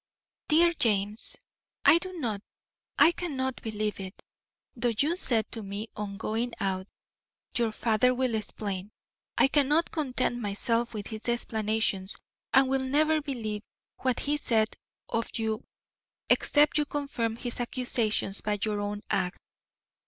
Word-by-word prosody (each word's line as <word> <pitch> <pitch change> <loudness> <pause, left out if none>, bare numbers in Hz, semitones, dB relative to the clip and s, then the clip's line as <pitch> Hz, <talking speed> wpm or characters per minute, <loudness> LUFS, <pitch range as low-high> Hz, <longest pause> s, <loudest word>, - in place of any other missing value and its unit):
DEAR 340 +2 +5
JAMES: 215 - +2 0.5
I 335 - +8
do 370 +1 -6
not, 230 - -3 0.6
I 330 - +7
cannot, 265 -8 -3
believe 215 -2 -2
it. 190 0 -7 0.6
Though 240 -1 0
you 300 +8 +2
said 235 -11 +3
to 225 - -4
me 205 +2 -5
on 200 -1 -5
going 225 +3 -2
out, 190 -1 -1 0.7
"Your 235 -2 +2
father 225 +3 +2
will 255 -1 0
explain," 205 -2 -2 0.5
I - - +6
cannot 295 +3 +3
content 255 -5 0
myself 230 +2 0
with 205 -1 -4
his 220 +1 -4
explanations 220 -4 0 0.4
and 270 0 +6
will 265 0 +1
never 305 +4 +2
believe 225 -7 -4 0.4
what 255 -2 0
he 295 +1 +1
said 225 -6 +1 0.3
of 230 0 -2
you 220 0 -1 0.7
except 295 +1 +4
you 300 - +2
confirm 275 -7 -2
his 240 +1 -4
accusations 235 -5 0
by 210 -1 -1
your 210 -1 0
own 205 0 -3
act. 180 +1 0
230 Hz, 135 wpm, -28 LUFS, 210-270 Hz, 0.7 s, I